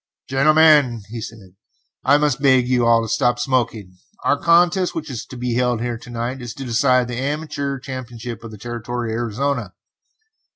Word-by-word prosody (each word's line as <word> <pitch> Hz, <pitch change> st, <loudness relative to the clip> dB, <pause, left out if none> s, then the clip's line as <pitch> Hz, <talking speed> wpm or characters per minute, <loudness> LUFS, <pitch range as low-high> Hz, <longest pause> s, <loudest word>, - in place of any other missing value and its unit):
"Gentlemen," 145 Hz, -4 st, +4 dB
he 115 Hz, 0 st, -6 dB
said, 100 Hz, -4 st, -10 dB, 0.5 s
"I 140 Hz, +3 st, +5 dB
must 145 Hz, -3 st, 0 dB
beg 130 Hz, -3 st, +4 dB
you 125 Hz, -2 st, +2 dB
all 115 Hz, -1 st, +4 dB
to -, -, -4 dB
stop 120 Hz, +1 st, +1 dB
smoking. 115 Hz, -7 st, -2 dB, 0.3 s
The -, -, +4 dB
contest 175 Hz, +3 st, +3 dB
which 155 Hz, -3 st, -5 dB
is 120 Hz, -3 st, -6 dB
to 130 Hz, -, -10 dB
be 125 Hz, 0 st, -2 dB
held 125 Hz, -1 st, +1 dB
here 120 Hz, -1 st, -3 dB
to 120 Hz, -, -13 dB
night 120 Hz, +2 st, -4 dB
is 120 Hz, -2 st, -7 dB
to 135 Hz, -, -7 dB
decide 125 Hz, +1 st, +2 dB
the 120 Hz, 0 st, -4 dB
Amateur 140 Hz, -1 st, -3 dB
Championship 120 Hz, -3 st, -7 dB
of 115 Hz, -, -8 dB
the 110 Hz, -, -10 dB
Territory 120 Hz, +1 st, -4 dB
of 115 Hz, -, -2 dB
Arizona. 125 Hz, +5 st, -2 dB
125 Hz, 180 wpm, -20 LUFS, 115-140 Hz, 0.5 s, I